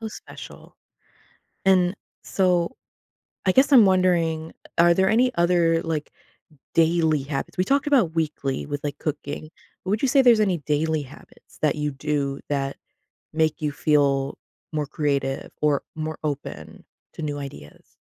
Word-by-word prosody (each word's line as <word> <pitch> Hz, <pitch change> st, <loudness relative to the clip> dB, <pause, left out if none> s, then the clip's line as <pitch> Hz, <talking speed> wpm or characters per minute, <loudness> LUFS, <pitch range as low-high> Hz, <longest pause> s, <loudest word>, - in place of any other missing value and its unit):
How 220 Hz, -, -4 dB
special. -, -, -12 dB, 0.9 s
And 185 Hz, -1 st, +4 dB, 0.3 s
so, 180 Hz, +4 st, +1 dB, 0.7 s
I 185 Hz, -, +3 dB
guess 270 Hz, +7 st, +4 dB
I'm 235 Hz, -6 st, +9 dB
wondering, 170 Hz, -4 st, +2 dB, 0.3 s
are 170 Hz, 0 st, +6 dB
there 190 Hz, +1 st, +3 dB
any 250 Hz, +3 st, +3 dB
other, 170 Hz, -1 st, +2 dB
like, 160 Hz, -3 st, -3 dB, 0.6 s
daily 160 Hz, -3 st, +3 dB
habits? 140 Hz, +4 st, -5 dB
We 185 Hz, -, +3 dB
talked 280 Hz, +7 st, +1 dB
about 230 Hz, -, +3 dB
weekly 150 Hz, -4 st, -2 dB
with, 145 Hz, 0 st, -5 dB
like, 145 Hz, -1 st, -3 dB
cooking; 150 Hz, 0 st, -5 dB, 0.4 s
would 205 Hz, +3 st, 0 dB
you 270 Hz, -, +2 dB
say 270 Hz, +1 st, +5 dB
there's 240 Hz, -3 st, +6 dB
any 195 Hz, -5 st, +2 dB
daily 155 Hz, +2 st, 0 dB
habits 135 Hz, +2 st, -17 dB
that 150 Hz, -2 st, +2 dB
you 150 Hz, -1 st, -2 dB
do 140 Hz, 0 st, -2 dB
that 135 Hz, -1 st, -2 dB, 0.6 s
make 160 Hz, 0 st, 0 dB
you 150 Hz, -, 0 dB
feel 140 Hz, -2 st, +1 dB, 0.4 s
more 150 Hz, -1 st, -1 dB
creative 140 Hz, -2 st, -2 dB
or 150 Hz, -2 st, +2 dB
more 155 Hz, 0 st, -4 dB
open 135 Hz, -, -6 dB, 0.3 s
to 160 Hz, -, -7 dB
new 145 Hz, -1 st, -3 dB
ideas? 75 Hz, -, -11 dB
155 Hz, 145 wpm, -24 LUFS, 145-180 Hz, 0.9 s, I'm